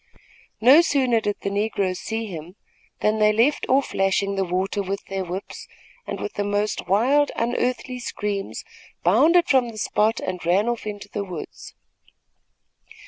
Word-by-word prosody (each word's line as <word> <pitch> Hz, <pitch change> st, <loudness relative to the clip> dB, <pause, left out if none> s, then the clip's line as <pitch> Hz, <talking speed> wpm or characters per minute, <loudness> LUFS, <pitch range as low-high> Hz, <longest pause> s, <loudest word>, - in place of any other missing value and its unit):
No 260 Hz, +8 st, +7 dB
sooner 260 Hz, -8 st, +2 dB
did 205 Hz, -1 st, -1 dB
the 200 Hz, -, -1 dB
negroes 200 Hz, -3 st, -1 dB
see 225 Hz, -3 st, -4 dB
them, 165 Hz, +4 st, -9 dB, 0.5 s
than 215 Hz, +1 st, +1 dB
they 210 Hz, 0 st, +5 dB
left 235 Hz, +7 st, +2 dB
off 270 Hz, +1 st, +2 dB
lashing 195 Hz, +1 st, +1 dB
the 195 Hz, -, +1 dB
water 190 Hz, +3 st, -1 dB
with 195 Hz, +1 st, -4 dB
their 195 Hz, -1 st, -3 dB
whips 185 Hz, +2 st, -7 dB, 0.4 s
and, -, -, -4 dB
with 415 Hz, -, -5 dB
the 205 Hz, -, -2 dB
most 205 Hz, -1 st, -1 dB
wild, 260 Hz, +10 st, +3 dB
unearthly 250 Hz, +1 st, -1 dB
screams, 205 Hz, -4 st, -4 dB, 0.4 s
bounded 345 Hz, +2 st, +4 dB
from 255 Hz, -3 st, +3 dB
the 220 Hz, -, -10 dB
spot 215 Hz, +2 st, +1 dB
and 185 Hz, -1 st, -4 dB
ran 185 Hz, +6 st, +2 dB
off 240 Hz, -2 st, -2 dB
into 205 Hz, -1 st, -6 dB
the 205 Hz, 0 st, -4 dB
woods. 180 Hz, -5 st, -9 dB
210 Hz, 155 wpm, -23 LUFS, 195-240 Hz, 0.5 s, No